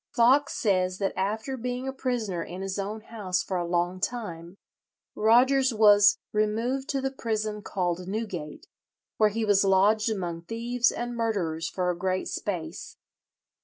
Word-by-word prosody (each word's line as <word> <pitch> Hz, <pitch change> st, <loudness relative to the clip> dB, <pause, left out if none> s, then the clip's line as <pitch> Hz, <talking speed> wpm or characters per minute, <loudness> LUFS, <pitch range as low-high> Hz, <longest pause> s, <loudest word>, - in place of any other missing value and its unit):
Foxe 265 Hz, +4 st, +3 dB
says 185 Hz, -3 st, +1 dB
that 195 Hz, -1 st, -1 dB
after 220 Hz, +7 st, -2 dB
being 250 Hz, +1 st, -4 dB
a 265 Hz, -, -3 dB
prisoner 235 Hz, -9 st, -2 dB
in 180 Hz, +2 st, -7 dB
his 195 Hz, +1 st, -3 dB
own 210 Hz, +3 st, -4 dB
house 200 Hz, -5 st, -3 dB
for 185 Hz, -, -3 dB
a 175 Hz, -1 st, -2 dB
long 175 Hz, +1 st, 0 dB
time, 185 Hz, -6 st, -4 dB, 0.6 s
Rogers 255 Hz, +3 st, +4 dB
was 205 Hz, -1 st, +6 dB, 0.2 s
"removed 230 Hz, +6 st, 0 dB
to 275 Hz, -2 st, 0 dB
the 270 Hz, 0 st, -1 dB
prison 215 Hz, -4 st, -3 dB
called 180 Hz, -2 st, -2 dB
Newgate, 200 Hz, -, -5 dB, 0.5 s
where 215 Hz, -1 st, +4 dB
he 225 Hz, +2 st, -2 dB
was 205 Hz, -1 st, +4 dB
lodged 200 Hz, +3 st, +3 dB
among 175 Hz, -6 st, -3 dB
thieves 235 Hz, +3 st, +1 dB
and 240 Hz, 0 st, -4 dB
murderers 175 Hz, -8 st, -1 dB
for 180 Hz, -1 st, -1 dB
a -, -, -4 dB
great 185 Hz, +1 st, -1 dB
space." 175 Hz, -3 st, -5 dB
210 Hz, 155 wpm, -27 LUFS, 185-235 Hz, 0.6 s, was